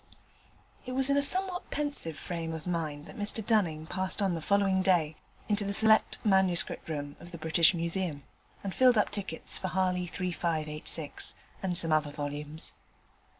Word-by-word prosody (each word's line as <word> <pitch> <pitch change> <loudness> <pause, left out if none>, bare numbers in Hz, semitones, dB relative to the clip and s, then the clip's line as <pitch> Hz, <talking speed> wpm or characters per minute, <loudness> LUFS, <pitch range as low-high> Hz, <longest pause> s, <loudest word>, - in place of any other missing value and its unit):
It 255 - -6
was 265 +1 +4
in 280 - +3
a - - +4
somewhat 365 +5 +3
pensive 285 - -1
frame 165 -2 -5
of 160 -1 -7
mind 155 -4 -3
that - - -12
Mr 210 +1 +1
Dunning 170 -9 +1
passed 190 +5 0
on 195 -3 +1
the 165 - -4
following 195 +1 +2
day 170 -5 +2 0.3
into 210 -1 0
the 200 0 -2
Select 220 +1 +4
Manuscript 190 -5 +2
Room 145 -2 -5
of 175 0 -12
the 170 - -7
British 160 +2 +4
Museum, 170 -3 -2 0.4
and 195 -2 -4
filled 250 -2 +4
up 210 - +2
tickets 190 -6 -2
for 185 - -3
Harley 180 -1 0
3586, 160 -4 -2 0.3
and 180 -2 0
some 165 -1 +4
other 155 -1 +2
volumes. 150 +1 -4
180 Hz, 165 wpm, -29 LUFS, 160-200 Hz, 0.4 s, was